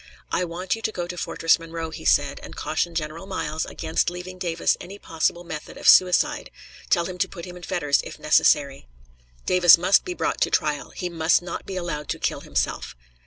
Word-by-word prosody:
"I 180 Hz, -, +1 dB
want 180 Hz, +3 st, -3 dB
you 225 Hz, -, -10 dB
to 220 Hz, -, -1 dB
go 175 Hz, -4 st, -4 dB
to 180 Hz, +1 st, -6 dB
Fortress 165 Hz, -1 st, +1 dB
Monroe," 165 Hz, -1 st, -6 dB
he 160 Hz, 0 st, -9 dB
said, 145 Hz, -1 st, +2 dB
"and -, -, -10 dB
caution 170 Hz, +2 st, -2 dB
General 160 Hz, +3 st, -4 dB
Miles 160 Hz, -4 st, -3 dB
against 160 Hz, -, -1 dB
leaving 180 Hz, +1 st, -8 dB
Davis 170 Hz, -2 st, +1 dB
any 195 Hz, +3 st, -9 dB
possible 170 Hz, -1 st, -1 dB
method 160 Hz, -3 st, -8 dB
of -, -, -4 dB
suicide; 180 Hz, -1 st, +5 dB, 0.4 s
tell 170 Hz, -2 st, +3 dB
him 180 Hz, 0 st, -7 dB
to -, -, +1 dB
put 170 Hz, -3 st, -8 dB
him 180 Hz, -1 st, -9 dB
in 180 Hz, -, -11 dB
fetters, 170 Hz, -6 st, +1 dB
if -, -, -9 dB
necessary. 140 Hz, -, +2 dB, 0.6 s
Davis 175 Hz, -2 st, +7 dB
must 185 Hz, +3 st, +4 dB
be 360 Hz, -, -5 dB
brought -, -, -2 dB
to -, -, +3 dB
trial; -, -, 0 dB
he 180 Hz, -, -5 dB
must 170 Hz, 0 st, +2 dB
not 175 Hz, -, -6 dB
be 195 Hz, -, -5 dB
allowed 170 Hz, -5 st, -4 dB
to -, -, -1 dB
kill -, -, -2 dB
himself." -, -, -3 dB
175 Hz, 205 wpm, -24 LUFS, 160-180 Hz, 0.6 s, Davis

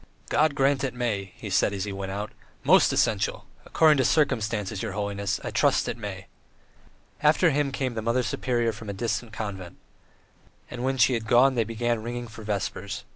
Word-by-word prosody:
"God 155 Hz, -2 st, +2 dB
grant 135 Hz, 0 st, +2 dB
it 130 Hz, -2 st, -2 dB
may," 105 Hz, -6 st, -2 dB
he 105 Hz, -, -8 dB
said 100 Hz, -, +2 dB
as 95 Hz, -2 st, -3 dB
he 100 Hz, -1 st, -4 dB
went 95 Hz, 0 st, -5 dB
away. 105 Hz, +2 st, -4 dB, 0.3 s
"Most -, -, +5 dB
essential! -, -, 0 dB, 0.2 s
According 155 Hz, -2 st, +4 dB
to 130 Hz, -, +3 dB
circumstances, 115 Hz, -8 st, 0 dB
your 110 Hz, -4 st, -4 dB
holiness! 100 Hz, -1 st, -2 dB
I -, -, -4 dB
trust -, -, +2 dB
it -, -, -2 dB
may!" -, -, -7 dB, 1.0 s
After 155 Hz, +3 st, +4 dB
him 145 Hz, 0 st, 0 dB
came 130 Hz, -2 st, -2 dB
the 110 Hz, -, -3 dB
Mother 115 Hz, +3 st, +1 dB
Superior 120 Hz, +1 st, 0 dB
from 110 Hz, -1 st, -9 dB
a -, -, -3 dB
distant 115 Hz, +2 st, -3 dB
convent. 100 Hz, -5 st, -6 dB, 0.9 s
And 125 Hz, 0 st, -5 dB
when 135 Hz, +1 st, 0 dB
she 125 Hz, +1 st, +4 dB
had 115 Hz, -2 st, -2 dB
gone 130 Hz, +4 st, +5 dB
they 120 Hz, -3 st, +1 dB
began 115 Hz, +1 st, -1 dB
ringing 120 Hz, +1 st, -5 dB
for 110 Hz, 0 st, -11 dB
vespers. 100 Hz, -1 st, -4 dB
115 Hz, 185 wpm, -26 LUFS, 100-130 Hz, 1.0 s, Most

